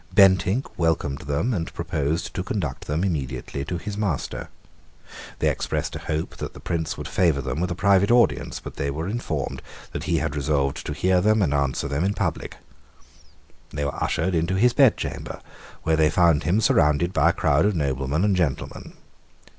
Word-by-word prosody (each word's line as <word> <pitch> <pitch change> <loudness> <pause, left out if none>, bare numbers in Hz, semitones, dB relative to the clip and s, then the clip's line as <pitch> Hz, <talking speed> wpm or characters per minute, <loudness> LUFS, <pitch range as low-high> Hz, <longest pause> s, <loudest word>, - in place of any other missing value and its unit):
Bentinck 95 +3 +4
welcomed 80 -4 0
them, 80 - 0
and 85 -6 -3
proposed 80 +3 -2
to 90 - -2
conduct 90 -10 -4
them 75 +4 -1
immediately 70 -6 -3
to 90 +3 -3
his 105 +3 -5
master. 85 - -2 0.9
They - - +1
expressed - - -1
a - - -4
hope 80 +1 -3
that - - -6
the - - -9
Prince 80 -3 -3
would - - -5
favour 85 -6 +2
them 65 +4 -3
with 90 - 0
a 85 - -2
private 100 +1 +3
audience; 120 0 +2
but - - -10
they 70 - -1
were 80 +5 -3
informed 95 - -3 0.3
that - - -5
he - - +1
had 75 +1 -2
resolved 70 -1 0
to 75 - -2
hear 90 +4 +2
them 110 +1 +3
and 75 - +1
answer 70 -1 0
them 70 +3 -1
in 100 +2 0
public. - - -3 1.1
They 75 -1 -3
were 70 - -2
ushered 85 +2 0
into 85 +3 +1
his 120 +5 +4
bedchamber, 135 -4 +1 0.4
where 80 0 +2
they 80 -1 +4
found 85 -3 +3
him 95 +7 +2
surrounded 85 -2 +3
by - - +4
a - - +2
crowd 75 +7 +2
of 105 - 0
noblemen 70 +1 0
and 100 -2 +2
gentlemen. 80 -7 -2
80 Hz, 185 wpm, -24 LUFS, 70-95 Hz, 1.1 s, Bentinck